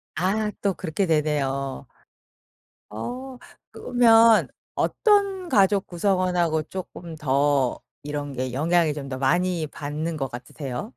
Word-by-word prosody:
아. 210 Hz, +5 st, 0 dB
또 200 Hz, -2 st, +1 dB
그렇게 185 Hz, +2 st, -2 dB
되네요. 140 Hz, -4 st, -1 dB, 1.1 s
어. 250 Hz, -, -6 dB, 0.3 s
그러면 230 Hz, -2 st, +5 dB, 0.3 s
어떤 395 Hz, -4 st, +1 dB
가족 200 Hz, -, +3 dB
구성원하고 180 Hz, -3 st, +1 dB
쪼끔 170 Hz, -1 st, -8 dB
더 140 Hz, -2 st, +1 dB, 0.2 s
이런 145 Hz, -1 st, -4 dB
게 130 Hz, -1 st, -3 dB
영향이 160 Hz, +3 st, +2 dB
좀 140 Hz, -2 st, -6 dB
더 130 Hz, -1 st, -5 dB
많이 170 Hz, +4 st, +1 dB
받는 150 Hz, +3 st, -4 dB
것 135 Hz, -3 st, -3 dB
같으세요? 130 Hz, -, -6 dB
165 Hz, 225 characters per minute, -24 LUFS, 145-200 Hz, 1.1 s, 그러면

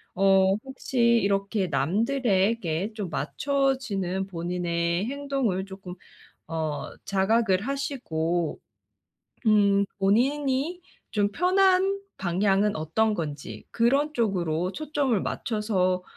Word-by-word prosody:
어 195 Hz, 0 st, +4 dB
혹시 265 Hz, -1 st, -7 dB, 0.3 s
이렇게 200 Hz, 0 st, 0 dB
남들에게 200 Hz, -, 0 dB
좀 205 Hz, -5 st, -5 dB
맞춰지는 205 Hz, -, -1 dB
본인의 170 Hz, 0 st, -1 dB
행동을 270 Hz, -8 st, -1 dB
조금 190 Hz, -2 st, -9 dB, 0.5 s
어 155 Hz, -2 st, -3 dB
자각을 200 Hz, 0 st, +2 dB
하시고 175 Hz, -, -2 dB, 0.9 s
음 200 Hz, -2 st, +4 dB
본인이 270 Hz, -, +1 dB, 0.3 s
좀 205 Hz, -2 st, +1 dB
편한 380 Hz, -, +3 dB, 0.2 s
방향은 195 Hz, +2 st, +1 dB
어떤 210 Hz, +8 st, +1 dB
건지 150 Hz, -6 st, -6 dB
그런 275 Hz, +6 st, +2 dB
쪽으로 180 Hz, -, 0 dB
초점을 285 Hz, -8 st, 0 dB
맞춰서 190 Hz, -5 st, -1 dB
200 Hz, 205 characters per minute, -26 LUFS, 180-260 Hz, 0.9 s, 어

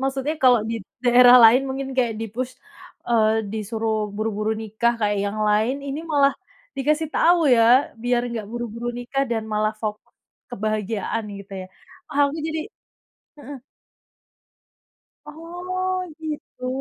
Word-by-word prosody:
Maksudnya 270 Hz, +3 st, -1 dB
kalau 250 Hz, -3 st, +6 dB
di -, -, -2 dB, 0.3 s
daerah 245 Hz, 0 st, +8 dB
lain 245 Hz, +4 st, +7 dB
mungkin 270 Hz, 0 st, -4 dB
kaya 240 Hz, -3 st, +2 dB
di-push, 245 Hz, +4 st, -4 dB, 0.6 s
eee, 220 Hz, -1 st, +2 dB
disuruh 220 Hz, +1 st, -2 dB, 0.2 s
buru-buru 215 Hz, 0 st, -1 dB
nikah 220 Hz, +2 st, 0 dB
kayak 205 Hz, -1 st, +1 dB
yang 210 Hz, +2 st, -4 dB
lain, 215 Hz, +5 st, +2 dB
ini 280 Hz, +3 st, -4 dB
malah 280 Hz, -1 st, +4 dB, 0.4 s
dikasih 305 Hz, +3 st, 0 dB
tahu 345 Hz, +1 st, +4 dB, 0.2 s
ya 230 Hz, -, +5 dB, 0.4 s
biar 245 Hz, 0 st, +2 dB
nggak 220 Hz, -3 st, -5 dB
buru-buru 240 Hz, 0 st, -5 dB
nikah, 270 Hz, +3 st, -2 dB
dan 225 Hz, -2 st, -1 dB
malah 215 Hz, +1 st, +1 dB
fok 210 Hz, -1 st, -2 dB, 0.5 s
kebahagiaan 215 Hz, 0 st, -2 dB
gitu 200 Hz, 0 st, -12 dB
ya. -, -, -12 dB, 0.4 s
Ah 285 Hz, -, -4 dB
aku 290 Hz, -, -6 dB
jadi 320 Hz, 0 st, -2 dB, 0.8 s
heeh. 280 Hz, -1 st, -9 dB, 1.7 s
Oh 360 Hz, +4 st, -4 dB, 0.2 s
gitu. 300 Hz, -5 st, -6 dB
240 Hz, 130 wpm, -23 LUFS, 220-275 Hz, 1.7 s, daerah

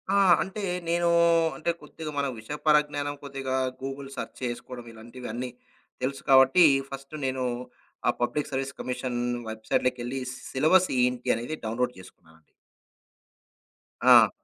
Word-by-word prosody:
ఆ! -, -, +5 dB, 0.2 s
అంటే 195 Hz, +2 st, -6 dB, 0.3 s
నేను 170 Hz, 0 st, +2 dB, 0.5 s
అంటే 170 Hz, +1 st, 0 dB
కొద్దిగా 155 Hz, +1 st, -7 dB
మన 140 Hz, -, +1 dB
విషయ 110 Hz, +7 st, -6 dB
పరజ్ఞానం 145 Hz, -1 st, +2 dB
కొద్దిగా 135 Hz, -1 st, -3 dB, 0.3 s
గూగుల్ 135 Hz, 0 st, -5 dB
సెర్చ్ -, -, -5 dB
చేసుకోవడం 120 Hz, 0 st, -5 dB
ఇలాంటివన్నీ 120 Hz, +2 st, -6 dB, 0.5 s
తెలుసు 135 Hz, +2 st, -2 dB
కాబట్టి, 135 Hz, +6 st, +7 dB, 0.3 s
ఫస్టు 135 Hz, +2 st, -8 dB
నేను 130 Hz, -1 st, -1 dB, 0.6 s
ఆ -, -, +6 dB
పబ్లిక్ 145 Hz, +5 st, 0 dB
సర్వీస్ 135 Hz, 0 st, -3 dB
కమిషన్ 125 Hz, -1 st, -3 dB, 0.3 s
వెబ్‌సైట్‌లోకెళ్ళి 120 Hz, +3 st, -1 dB, 0.3 s
సిలబస్ 170 Hz, +7 st, +4 dB
ఏంటి 125 Hz, 0 st, 0 dB
అనేది 120 Hz, +7 st, -4 dB
డౌన్‌లోడ్ 125 Hz, +3 st, -1 dB
జేసుకున్నానండి. 80 Hz, -3 st, -18 dB, 1.5 s
ఆ! -, -, +8 dB
130 Hz, 115 wpm, -27 LUFS, 125-145 Hz, 1.5 s, ఆ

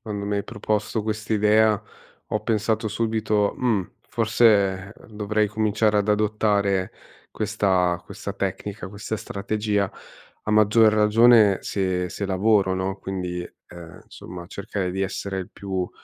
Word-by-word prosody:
quando 100 Hz, -2 st, -5 dB
mi 100 Hz, 0 st, -1 dB
hai 100 Hz, -, -2 dB
proposto 105 Hz, +1 st, -2 dB
quest'idea, 110 Hz, 0 st, +2 dB, 0.5 s
ho 110 Hz, -, -1 dB
pensato 110 Hz, 0 st, 0 dB
subito: 110 Hz, -1 st, 0 dB
"Mhmm, 110 Hz, -8 st, 0 dB, 0.2 s
forse 105 Hz, -4 st, +2 dB, 0.2 s
dovrei 105 Hz, 0 st, -1 dB
cominciare 110 Hz, 0 st, +1 dB
ad 100 Hz, -, 0 dB
adottare 105 Hz, -2 st, +1 dB, 0.4 s
questa 90 Hz, -3 st, +1 dB
questa -, -, -7 dB
tecnica, 100 Hz, -3 st, -4 dB
questa 105 Hz, +2 st, -5 dB
strategia." 105 Hz, 0 st, -2 dB, 0.5 s
A 105 Hz, -, -1 dB
maggior 110 Hz, +1 st, +5 dB
ragione 105 Hz, -1 st, +5 dB
se 90 Hz, -2 st, -1 dB
se 100 Hz, -, -5 dB
lavoro, 95 Hz, 0 st, +2 dB
no, 95 Hz, +1 st, -2 dB
quindi, 90 Hz, -2 st, -4 dB, 0.3 s
uhm, 85 Hz, -1 st, -11 dB
insomma, 90 Hz, -1 st, -10 dB
cercare 100 Hz, -2 st, -4 dB
di 95 Hz, -, -3 dB
essere 95 Hz, 0 st, -3 dB
il 95 Hz, -, -6 dB
più 95 Hz, -2 st, -3 dB
105 Hz, 125 wpm, -24 LUFS, 95-110 Hz, 0.5 s, maggior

